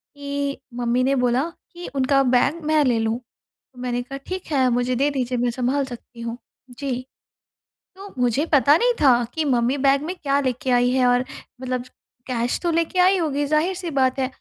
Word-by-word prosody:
कि 280 0 -3 0.2
मम्मी 245 +1 +1
ने 275 +1 +2
बोला 245 +2 +2 0.3
कि 350 0 -8
उनका 275 +1 +3
बैग 265 +6 +2
मैं 310 0 +3
ले 240 -3 +2
लूँ। 225 +1 0
तो 250 +1 -25
मैंने 245 -1 -1
कहा 275 +2 -7
ठीक 370 0 -5
है 260 -3 +3
मुझे 245 +1 0
दे 275 +4 +2
दीजिए, 255 -2 -2
मैं 240 0 +1
सँभाल 260 +3 0
सकती 240 -1 -11
हूँ। 230 0 -4 0.4
जी। 255 -3 -3 0.9
तो 395 +1 -11
मुझे 250 +4 +1
पता 280 +1 +6
नहीं - - +2
था 250 -4 +5
कि 320 -1 -1
मम्मी 250 0 +1
बैग 275 +1 +4
में 355 +4 -4
क्या 280 -1 +2
लेके 255 -1 -1
आई 245 0 +4
है? 255 0 +2
और 245 0 +3 0.4
मतलब 255 -1 -2 0.4
कैश 245 -1 -1
तो 345 - +1
लेके 335 +2 0
आई 370 +2 +5
होगी 290 -4 0
ज़ाहिर 310 +5 +1
सी 355 -1 -5
बात 260 0 +2
है 260 - +1
265 Hz, 195 wpm, -22 LUFS, 245-290 Hz, 0.9 s, पता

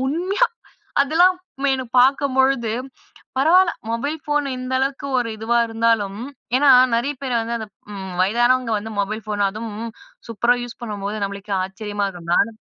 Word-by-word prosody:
உண்மையா 370 - +1 0.5
அதெல்லாம் 340 +6 +4 0.3
மே 280 - +2
எனக்கு 260 -3 -6
பார்க்கும்பொழுது 265 -3 +2 0.6
பரவாயில்ல 340 +6 +5 0.2
மொபைல் 285 +7 -2
ஃபோன் 295 0 +1
இந்த 255 0 -5
அளவுக்கு 275 +1 -2
ஒரு 235 -2 -1
இதுவா 225 +2 +1
இருந்தாலும், 225 -3 0 0.4
ஏன்னா 285 +1 +4 0.3
நிறைய 255 +5 0
பேரு 255 -3 -2
வந்து 235 +1 -2
அந்த 220 - -6 0.3
ம் 190 -2 -6
வயதானவங்க 240 +4 +2
வந்து 220 +1 -7
மொபைல் 215 +2 -3
ஃபோன் 205 -1 -1
அதும் 220 +2 -6 0.6
சூப்பரா 235 +2 +2
யூஸ் 245 -1 -9
பண்ணும்போது, 205 -2 -4
நம்மளுக்கே 200 +1 -6
ஆச்சரியமா 205 +1 -4
இருக்கும். 175 -3 -8
நானும் 225 -1 +1
235 Hz, 145 wpm, -21 LUFS, 215-275 Hz, 0.6 s, பரவாயில்ல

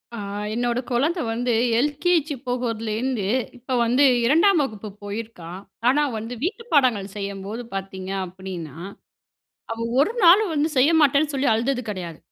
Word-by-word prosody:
ஆ, - - -6 0.4
என்னோட 240 +1 0
குழந்த 300 +9 +1
வந்து 240 +1 0 0.3
எல்கேஜி 300 +2 +1
போகறதுலருந்து 230 -2 -2 0.3
இப்போ 255 +2 -5
வந்து 250 +5 +3 0.2
2ஆம் 335 +8 +4
வகுப்பு 215 -5 -6
போயிருக்கா. 205 -5 -7 0.4
ஆனா 295 +3 +3
வந்து 225 +3 -5
வீட்டு 415 +7 -2
பாடங்கள் 225 -9 +2
செய்யம்போது 200 +3 -5
பார்த்தீங்க 190 -1 -5
அப்டின்னா, 180 -5 -8 1.0
அவ 230 - -6 0.2
1 310 +10 +2
நாளும் 370 +2 +6
வந்து 300 +1 +1
செய்யமாட்டேன்னு 300 0 +4
சொல்லி 275 +1 +1
அழுதது 250 +3 0
கெடையாது. 175 -5 -6
245 Hz, 125 wpm, -23 LUFS, 205-290 Hz, 1.0 s, நாளும்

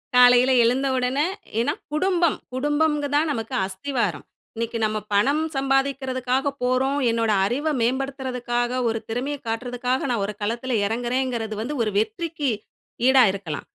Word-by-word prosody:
காலையில 250 +1 +7
எழுந்த 255 +4 +2
உடனே 255 +4 +1 0.3
ஏன்னா 235 - +1 0.2
குடும்பம் 345 0 +2 0.2
குடும்பம் 295 +3 +1 0.2
தான் 305 +1 +2
நமக்கு 225 -4 -3
அஸ்திவாரம். 235 +7 -2 0.3
இன்னிக்கு 230 +1 -3
நம்ம 215 0 +1 0.2
பணம் 280 +10 +3
சம்பாதிக்கிறதுக்காக 270 -1 0
போறோம், 260 +3 +1
என்னோட 230 -1 +1
அறிவ 275 +9 -1
மேம்படுத்துறதுக்காக, 250 -1 -1
ஒரு 225 0 0
திறமைய 260 +6 -2
காட்றதுக்காக 245 +3 -1
நா 245 - +1
ஒரு 210 +1 -3
களத்துல 235 +4 -2
எறங்குறேங்கறது 240 -1 -2
வந்து 285 +6 -3
ஒரு 215 - -1
வெற்றிக்கு 285 +7 -1 0.6
ஈடா 265 -1 +7
இருக்கலாம். 180 -7 -6
250 Hz, 125 wpm, -23 LUFS, 230-275 Hz, 0.6 s, காலையில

